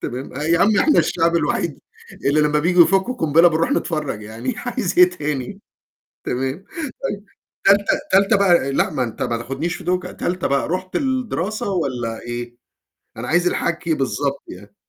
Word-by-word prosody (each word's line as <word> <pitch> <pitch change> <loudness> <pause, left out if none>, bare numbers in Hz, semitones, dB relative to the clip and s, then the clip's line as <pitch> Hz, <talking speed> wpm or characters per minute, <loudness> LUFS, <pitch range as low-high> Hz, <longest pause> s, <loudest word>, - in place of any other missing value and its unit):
تمام 125 +1 -6
أ 145 - -4
يا 165 +2 +2
عم 215 +3 +4
إحنا 305 - +4
الشعب 170 0 +2
الوحيد - - -1 0.5
اللي 150 +2 +3
لمّا 150 0 +2
بييجوا 175 +3 +5
يفكّوا 195 +6 +1
قنبلة 165 - +4
بنروح 165 0 0
نتفرّج 150 -10 -2
يعني 110 - -5
عايز 245 -7 -3
إيه 180 0 +8
تاني 150 +2 -4 0.6
تمام، 135 +8 -3 0.4
طيب، 205 -3 -3 0.4
تالتة 200 +1 +5 0.3
تالتة 200 +2 +4
بقى 175 -8 +3
آآ، - - -1
لأ - - +1
ما 125 - -1
أنت 115 - -6
ما 120 -1 -1
تاخدنيش 135 +9 -3
في - - -10
دوكة، 180 0 -1
تالتة 180 0 -2
بقى 140 -1 0
رُحت 185 +2 -4
الدراسة 240 - -1
والّا 125 -10 -2
إيه؟ 120 0 -6 0.6
أنا 125 +2 -6
عايز 175 +2 +2
الحكي 170 -1 0
بالضبط 140 0 -2
يعني. - - -12
165 Hz, 170 wpm, -20 LUFS, 135-190 Hz, 0.6 s, إيه